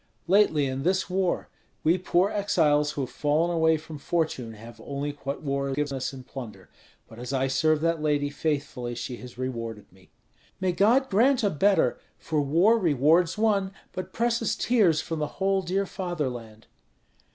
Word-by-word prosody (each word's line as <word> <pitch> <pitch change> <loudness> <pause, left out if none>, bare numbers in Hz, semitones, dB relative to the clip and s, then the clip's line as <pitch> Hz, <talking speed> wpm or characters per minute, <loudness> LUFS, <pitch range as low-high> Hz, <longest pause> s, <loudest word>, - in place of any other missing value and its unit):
"Lately, 170 -5 +4
in 130 0 -3
this 185 +3 0
war. 185 -1 0 0.4
We 170 +4 +3
poor 185 +2 +2
exiles 150 -8 +2
who 145 - -3
have 130 - -4
fallen 155 +4 +1
away 160 -1 +3
from 155 -1 -10
fortune 140 -8 -2
have 115 +1 -12
only 140 +1 -3
what 140 +3 -4
war 140 -1 -1
gives 145 0 -1
us 130 -1 -3
in 130 -2 -10
plunder. 125 -4 -9 0.4
But 110 - -13
as 125 +1 -6
I 135 0 +1
serve 155 +3 +2
that 165 -1 0
lady 145 -1 0
faithfully, 140 -5 -3
she 120 +1 -5
has 125 0 -11
rewarded 115 -4 -5
me." 95 -1 -22 0.5
"May 185 -1 +1
God 230 +9 +3
grant 245 +5 +3
a 205 - +2
better; 165 -4 +2 0.2
for 155 -2 -1
war 175 +11 +4
rewards 165 - +3
one, 200 -3 +1 0.2
but 185 0 -6
presses 235 0 0
tears 200 -10 +3
from 165 -1 -4
the 150 - -1
whole 195 0 +1
dear 190 +2 -1
fatherland." 130 - -5
155 Hz, 170 wpm, -26 LUFS, 135-190 Hz, 0.5 s, Lately